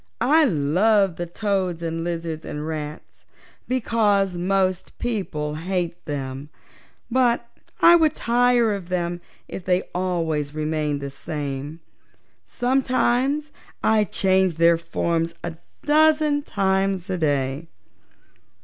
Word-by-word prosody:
I 300 +7 +4
love 185 - +2
the 175 -1 -4
toads 185 -3 -2
and 165 0 -3
lizards 165 -2 -4
and 150 +1 -5
rats, 155 -1 -7 0.4
because 210 -6 +1
most 185 0 -1
people 185 -11 -3
hate 175 +1 -3
them, 135 -1 -5 0.6
but 240 -1 +2 0.4
I 340 +1 +9
would 315 -3 +2
tire 240 -1 +3
of 190 -3 -6
them 175 -1 -2 0.3
if 190 - -7
they 180 +1 +1
always 165 -5 -1
remained 155 -2 -1
the 140 0 -5
same. 145 +1 -5 0.7
Sometimes 265 +3 +1 0.3
I 220 -1 +4
change 190 -2 +1
their 170 0 +4
forms 170 0 -1
a 170 -2 -5 0.3
dozen 305 -1 +4
times 195 -5 0
a 185 -2 -2
day." 140 0 -1
180 Hz, 115 wpm, -23 LUFS, 160-225 Hz, 0.7 s, I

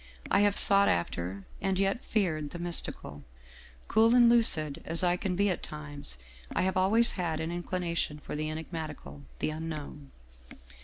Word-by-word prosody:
I - - +4
have 205 0 +3
sought 200 0 +7
after, 90 +3 -3 0.2
and 195 -1 0
yet 195 +4 0
feared 160 -9 -1
the 175 - -8
mystical; 170 - -1 0.6
cool 225 +2 +4
and 240 -1 +6
lucid 160 -11 +3
as 165 +2 -3
I 175 0 +3
can 180 0 -3
be 200 +2 +2
at 180 - -4
times, 145 - -6 0.4
I - - +1
have 190 0 -1
always 215 +6 +4
had 170 -4 -3
an 160 +1 -3
inclination 175 -3 -3
for 150 - -8
the 155 +1 -3
enigmatical, 155 - -7
the - - -2
Unknown. 155 -3 -7
170 Hz, 160 wpm, -29 LUFS, 150-195 Hz, 0.6 s, sought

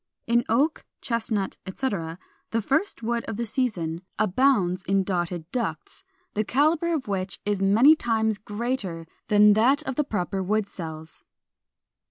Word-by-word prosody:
In 235 +1 +3
Oak, 280 +8 +2 0.2
Chestnut, 225 -4 -2
etc., 190 -6 -3 0.3
the 230 - 0
first 280 - 0
wood 235 +1 -1
of 220 - -5
the 235 - -2
season 185 -9 -1 0.2
abounds 195 -4 +2
in 195 0 +2
dotted 175 -3 -3
ducts, 250 +8 -4 0.3
the 215 - 0
calibre 310 - +2
of 270 -5 -4
which 190 -2 -3
is 205 -2 0
many 225 +11 +6
times 220 -6 0
greater 205 -5 -3 0.2
than 210 -1 +6
that 260 +8 +3
of 265 -4 -4
the 300 - +3
proper 195 -6 -2
wood 210 +3 0
cells. 160 -4 -8
215 Hz, 145 wpm, -25 LUFS, 190-250 Hz, 0.3 s, many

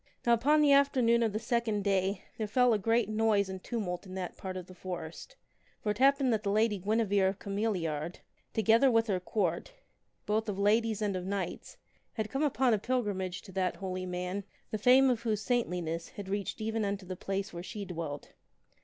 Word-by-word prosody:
Now 235 - +5
upon 290 +7 +4
the 295 -1 +5
afternoon 255 -4 +4
of 225 -2 +2
the 210 - -2
second 230 -2 0
day 195 -1 0 0.2
there 215 - -1
fell 250 +3 +4
a 215 - +1
great 225 +2 +2
noise 215 -2 +2
and 190 -1 -7
tumult 195 -6 -3
in 185 - -8
that 185 -2 -4
part 185 -1 -6
of 180 - -6
the 185 - -13
forest. 180 - -7 0.5
For 210 - +1
it 210 - -5
happened 275 -2 +4
that 215 - 0
the 205 - -2
Lady 210 0 +2
Guine 220 +4 +1
vere 195 -1 +3
of 190 0 -1
Cameliard, 180 -7 -2 0.4
together 225 +5 +4
with 225 -2 +3
her 195 -5 0
Court, 180 - -2 0.5
both 215 +1 0
of 195 - -3
ladies 215 +1 +2
and 200 -2 0
of 180 0 -4
knights, 200 -1 -4 0.4
had 215 -2 -3
come 270 - -1
upon 265 -4 +2
a 215 - +2
pilgrimage 200 -7 -2
to 195 - -12
that 185 -1 0
holy 185 -1 -4
man, 180 +2 -3 0.3
the 215 - -2
fame 255 +4 +6
of 245 -3 +1
whose 215 -3 -1
saintli 230 -8 0
ness 165 +1 -4
had 200 -2 -9
reached 200 +1 -3
even 220 0 -1
unto 200 -1 -2
the 185 0 -5
place 195 +2 -3
where 170 - -5
she 205 +2 -6
dwelt. 165 -5 -6
205 Hz, 205 wpm, -31 LUFS, 185-230 Hz, 0.5 s, fame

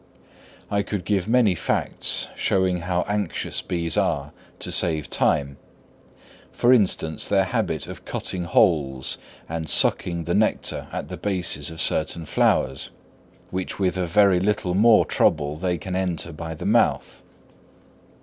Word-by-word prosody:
I 100 0 +2
could 100 -2 -4
give 100 -3 0
many 115 -4 +4
facts 85 - -1
showing 95 -1 +1
how 90 +1 -1
anxious 105 -3 -2
bees 85 -2 -2
are - - 0 0.3
to - - -4
save 80 -3 -1
time: 70 -1 +1 0.9
for 120 +1 +4
instance, 95 -8 +1
their 100 -1 +4
habit 95 - -2
of - - -9
cutting 90 -2 -3
holes 75 -8 +1 0.3
and 80 -1 -4
sucking 85 -1 +1
the 85 +2 -2
nectar 110 +1 0
at - - -5
the - - -6
bases 90 -8 -2
of 80 0 -9
certain 80 +1 0
flowers, 65 -2 +1 0.6
which 95 0 -3
with 95 -2 0
a 90 -1 -1
very 100 0 +4
little 95 -2 0
more 110 +3 +5
trouble 75 -2 +1
they 90 +2 -1
can 90 +3 -5
enter 90 -3 -1
by 80 +1 -6
the - - -7
mouth. - - +1
90 Hz, 140 wpm, -23 LUFS, 80-100 Hz, 0.9 s, more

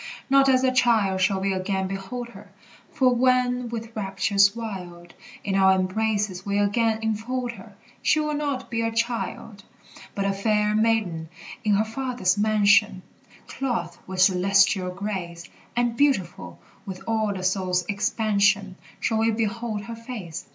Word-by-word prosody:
Not 275 0 +5
as 260 -1 +3
a 260 - +3
child 220 -7 +2
shall 190 +1 +2
we 195 0 0
again 190 0 -2
behold 195 +6 -6
her; - - -14 0.4
For 260 -5 +3
when 250 0 +2
with 230 -1 -6
raptures 200 0 +2
wild 180 -6 -7 0.3
In 200 - -2
our 190 0 +5
embraces 200 0 -1
we 200 0 -1
again 220 +2 +1
enfold 235 +3 -2
her, 235 - -14 0.3
She 310 - +3
will 300 0 -1
not 285 -4 -3
be 230 -1 -1
a 225 0 0
child: 230 -3 -3 0.5
But 200 - -1
a 200 - +1
fair 210 +1 +1
maiden, 215 -8 0 0.3
in 210 -1 +3
her 215 +2 +2
Father's 240 -5 -1
mansion, 210 -2 +3 0.4
Clothed 240 -10 -3
with 185 0 -2
celestial 190 0 +3
grace; 180 -3 -5 0.3
And 240 -1 +1
beautiful 185 - 0 0.3
with 190 -2 -8
all 220 -2 0
the 185 -2 -5
soul's 185 -1 0
expansion 200 -2 +1 0.2
Shall 225 -1 0
we 225 +1 +2
behold 225 -1 -2
her 230 +3 -7
face. 225 -8 -8
210 Hz, 150 wpm, -24 LUFS, 190-230 Hz, 0.5 s, Not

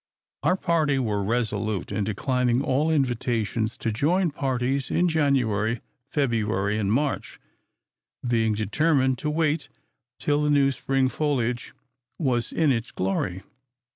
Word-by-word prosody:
Our 160 +6 +3
party 160 -6 +1
were 105 -6 0
resolute 110 -3 -1
in 105 0 -1
declining 125 +4 +1
all 145 +4 +1
invitations 120 -5 0
to 115 - -2
join 165 - +1
parties 135 0 -1
in 180 - +2
January, 125 - +1 0.3
February, 110 -6 0
and 100 -1 0
March; 140 +5 -1 0.9
being 115 -2 +2
determined 130 +4 +1
to 150 - -2
wait 155 0 0 0.5
till 145 0 +1
the 150 - +1
new 140 -2 +4
spring 135 0 0
foliage 125 -4 -1 0.4
was 125 -7 0
in 160 -4 +2
its 115 -2 -1
glory. 95 0 -2
125 Hz, 125 wpm, -25 LUFS, 110-145 Hz, 0.9 s, new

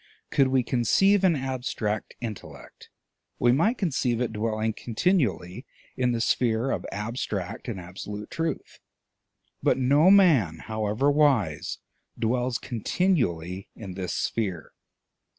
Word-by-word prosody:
Could 135 - +4
we 130 -1 +2
conceive 195 - +3
an 180 -4 +4
abstract 125 -5 -3
intellect, 110 -4 -9 0.5
we 120 - +4
might 205 - +2
conceive 130 - 0
it 120 -3 -1
dwelling 110 0 -1
continually 120 - -1 0.3
in 125 -1 +1
the 120 - -1
sphere 115 +1 +1
of - - -3
abstract 105 -3 -4
and 110 -6 -4
absolute 100 +4 -8
truth; 165 0 -4 0.8
but - - +2
no 140 +7 +4
man, 155 - +5
however 110 +5 0
wise, 110 - +1 0.4
dwells 120 +2 0
continually 105 - -1
in 100 -5 -8
this 90 -1 -4
sphere. 95 -9 -2
120 Hz, 115 wpm, -26 LUFS, 105-135 Hz, 0.8 s, man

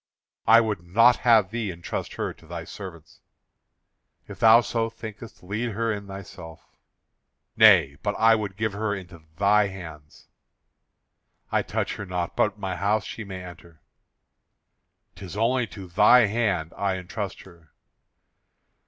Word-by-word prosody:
"I 115 +2 +8
would 105 -6 -2
not 115 +8 +4
have 110 -5 +4
thee 115 -3 -3
entrust 85 0 -6
her - - -3
to 80 - -20
thy 85 0 -6
servants." 85 -4 -11 1.1
"If - - -10
thou 115 +1 +7
so 115 -1 -2
thinkest, 110 -1 -11
lead 105 +5 -3
her 115 +1 -1
in 100 -1 -7
thyself." 95 -4 -11 0.8
"Nay, 70 +1 +6
but 105 0 -2
I 115 0 +5
would 105 -3 -2
give 110 -1 -1
her 105 0 -2
into 90 -3 -11 0.2
thy 105 +1 +3
hands." 80 -6 -11 1.2
"I - - +2
touch - - -3
her 105 - -6
not, 90 -1 -3
but 105 0 +1
my 95 -3 -4
house 105 +4 0
she 115 - -7
may 95 -2 -8
enter." 85 -2 -13 1.3
"'Tis 95 0 -9
only 120 +2 +1
to 100 -3 -10
thy 100 +7 +5
hand 100 -7 -1
I 100 -2 -1
entrust 95 +2 -6
her." 85 -4 -18
100 Hz, 145 wpm, -25 LUFS, 90-110 Hz, 1.3 s, I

